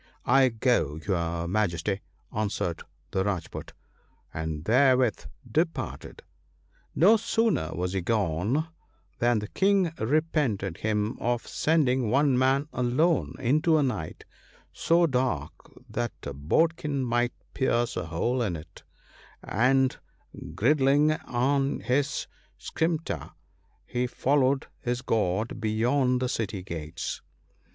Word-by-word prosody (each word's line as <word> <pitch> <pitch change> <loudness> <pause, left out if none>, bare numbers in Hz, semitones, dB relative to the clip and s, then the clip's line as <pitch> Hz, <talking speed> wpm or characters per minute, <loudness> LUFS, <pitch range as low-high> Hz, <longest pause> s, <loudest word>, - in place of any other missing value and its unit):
' - - -36 0.2
I 130 - +5
go, 115 - +1
your 85 -3 -1
Majesty,' 95 0 0 0.3
answered 100 -5 -2 0.3
the 95 - +1
Rajpoot, 95 -5 -4 0.6
and 80 0 -4
there 130 +4 +5
with 125 -4 0 0.2
departed. 160 +8 -2 0.4
" - - -39 0.3
No 200 +9 +6
sooner 225 - +1
was 90 +1 -2
he 95 - 0
gone 105 - 0 0.5
than 120 0 +3
the 105 0 -3
King 195 -3 +2
repented 125 - 0
him 105 0 -1
of 120 0 -1
sending 130 -7 +1
one 135 +2 +3
man 135 +3 +2
alone 130 +7 +1
into 155 +5 +2
a 150 - +3
night 105 - -4 0.5
so 170 +1 +3
dark 125 - 0 0.4
that 120 0 -3
a 70 - -5
bodkin 145 - 0
might 120 0 +1 0.2
pierce 120 -3 0
a 90 -3 -3
hole 115 +11 -1
in 100 -7 -1
it, 80 -1 -11 0.6
and 130 +3 +2 0.6
girding 145 +4 +4
on 135 -1 0
his 140 +3 0 0.3
scimitar, 160 - -2 0.5
he 125 +1 -1
followed 135 +1 +1
his 125 0 -2
guard 110 -2 -1
beyond 125 +4 +1
the 130 - 0
city 110 -5 -3
gates. 80 -3 -5
120 Hz, 120 wpm, -27 LUFS, 100-140 Hz, 0.6 s, No